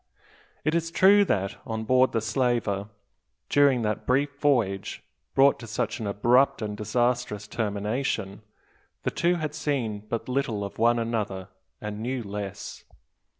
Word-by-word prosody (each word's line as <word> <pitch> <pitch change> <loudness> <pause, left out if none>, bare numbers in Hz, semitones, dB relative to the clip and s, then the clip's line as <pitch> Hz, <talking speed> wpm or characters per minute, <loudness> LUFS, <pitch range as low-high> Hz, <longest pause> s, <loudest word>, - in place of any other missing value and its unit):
It 155 - +2
is 165 0 0
true 195 +4 +6
that, 100 - -1
on 110 -1 -4
board 130 +3 +4
the 115 - 0
slaver, 115 -4 0 0.6
during 140 -4 +4
that 105 0 -2
brief 140 +2 +1
voyage, 115 -10 0 0.3
brought 140 +1 +5
to 115 - -9
such 110 - -2
an 110 - -3
abrupt 120 +5 +3
and 105 -1 -3
disastrous 120 -1 -1
termination, 105 -1 -2 0.6
the - - 0
two 175 +1 +2
had 155 -3 -3
seen 135 -9 -1
but 115 - -3
little 125 -5 -1
of 100 - -7
one 120 +1 +4
another, 105 -5 -2 0.3
and 105 0 -5
knew 125 +1 -2
less. 100 -1 -6
115 Hz, 145 wpm, -26 LUFS, 105-135 Hz, 0.6 s, true